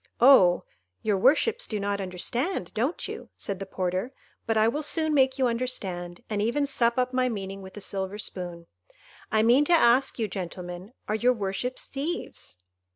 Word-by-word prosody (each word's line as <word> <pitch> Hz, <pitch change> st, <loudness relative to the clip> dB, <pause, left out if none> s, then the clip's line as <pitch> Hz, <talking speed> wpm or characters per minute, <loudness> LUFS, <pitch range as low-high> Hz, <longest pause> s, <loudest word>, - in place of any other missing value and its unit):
"Oh, 230 Hz, -9 st, +7 dB, 0.4 s
your 210 Hz, -2 st, +2 dB
worships 415 Hz, -, +3 dB
do 215 Hz, -, -2 dB
not 200 Hz, 0 st, -1 dB
understand, 190 Hz, -, -2 dB
don't 255 Hz, +10 st, -1 dB
you?" -, -, -8 dB
said 195 Hz, -2 st, -4 dB
the 195 Hz, -, -6 dB
porter; 185 Hz, +5 st, -2 dB, 0.4 s
"but 225 Hz, -1 st, +1 dB
I 215 Hz, 0 st, +5 dB
will 290 Hz, +7 st, 0 dB
soon 315 Hz, +1 st, +1 dB
make 265 Hz, -2 st, +3 dB
you 265 Hz, -, +2 dB
understand, 195 Hz, -8 st, -2 dB
and 210 Hz, -2 st, -1 dB
even 240 Hz, +7 st, +1 dB
sup 240 Hz, -4 st, +1 dB
up 255 Hz, 0 st, +1 dB
my 255 Hz, 0 st, +2 dB
meaning 195 Hz, -3 st, -5 dB
with 190 Hz, +1 st, -11 dB
a -, -, -6 dB
silver 195 Hz, +1 st, -3 dB
spoon. 175 Hz, -4 st, -6 dB, 0.7 s
I 220 Hz, 0 st, +3 dB
mean 245 Hz, +5 st, +5 dB
to 350 Hz, -, +3 dB
ask 265 Hz, -4 st, +4 dB
you, 225 Hz, -3 st, 0 dB
gentlemen, 180 Hz, +1 st, -7 dB
are -, -, -1 dB
your 245 Hz, +3 st, +3 dB
worships 215 Hz, +4 st, -3 dB
thieves? 285 Hz, -, -5 dB
220 Hz, 175 wpm, -27 LUFS, 190-260 Hz, 0.7 s, Oh